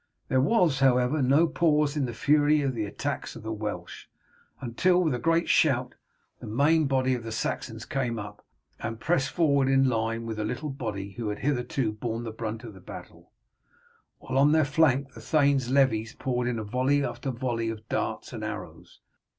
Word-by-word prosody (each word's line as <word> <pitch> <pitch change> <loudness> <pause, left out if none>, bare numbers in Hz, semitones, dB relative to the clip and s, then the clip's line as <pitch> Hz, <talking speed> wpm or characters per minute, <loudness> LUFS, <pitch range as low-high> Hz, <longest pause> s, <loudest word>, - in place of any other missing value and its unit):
There 130 -1 +3
was, 165 - +3
however, 130 +2 +3
no 140 +6 +4
pause 150 -3 +2
in 145 -3 0
the 120 - -5
fury 150 +3 +3
of 135 -2 0
the 110 -3 -2
attacks 100 - -4
of - - -10
the 110 - -4
Welsh, 110 -1 -6 0.5
until, 180 +9 +2
with 155 -5 +1
a 125 - -2
great 165 +3 +2
shout, 130 -5 +2 0.5
the - - -9
main 145 +7 +3
body 130 -1 +1
of 125 - -2
the 115 0 -7
Saxons 115 0 -3
came 125 -4 -2
up, 105 0 -8 0.4
and 115 0 -5
pressed 135 -1 +1
forward 140 -3 +2
in 135 0 +4
line 115 -1 -1
with 110 -1 -4
the 110 - -1
little 135 +7 -3
body 105 -7 -5
who 105 +2 -4
had 105 - -3
hitherto 130 -3 -1
borne 115 +2 -4
the 115 - -5
brunt 110 0 -5
of 115 -3 -9
the 95 - -14
battle, - - -11 0.9
while 130 +1 -2
on 145 +2 +5
their 155 -2 +4
flank 140 -3 +2
the 115 - -11
thane's 140 -1 +2
levies 115 -5 +2
poured 125 -2 -1
in 120 -2 -1
volley 130 +6 +1
after 135 - -4
volley 120 -2 -2
of 110 -1 -7
darts - - -3
and - - -6
arrows. - - -8
130 Hz, 190 wpm, -27 LUFS, 115-145 Hz, 0.9 s, on